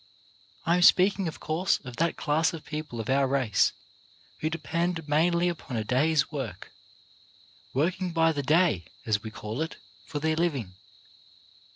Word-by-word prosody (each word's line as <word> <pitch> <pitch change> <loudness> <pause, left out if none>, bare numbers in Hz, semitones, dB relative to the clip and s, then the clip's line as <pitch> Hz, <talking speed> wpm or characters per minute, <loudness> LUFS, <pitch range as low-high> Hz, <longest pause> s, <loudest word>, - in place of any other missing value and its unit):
I 170 +1 +3
am - - +1
speaking, 190 +1 +5
of 160 - -6
course, 165 +5 +1
of 125 -1 -8
that 170 0 +1
class 155 +3 +1
of 165 - -8
people 150 -6 -5
of 115 - -4
our 135 +1 +3
race 130 -7 +2 0.7
who 155 - 0
depend 165 +1 -2
mainly 170 +4 +3
upon 160 -8 -4
a 110 - -1
day's 140 +5 +2
work 135 -7 -6 0.5
— 100 0 -28
working 180 +5 0
by 165 0 +3
the 145 -2 -2
day, 150 - +2 0.2
as 105 -2 +1
we 110 - -6
call 110 +4 -5
it 160 - -3 0.2
— 100 +1 -27
for - - -4
their 155 +2 0
living. 140 - -1
155 Hz, 170 wpm, -27 LUFS, 125-170 Hz, 0.7 s, speaking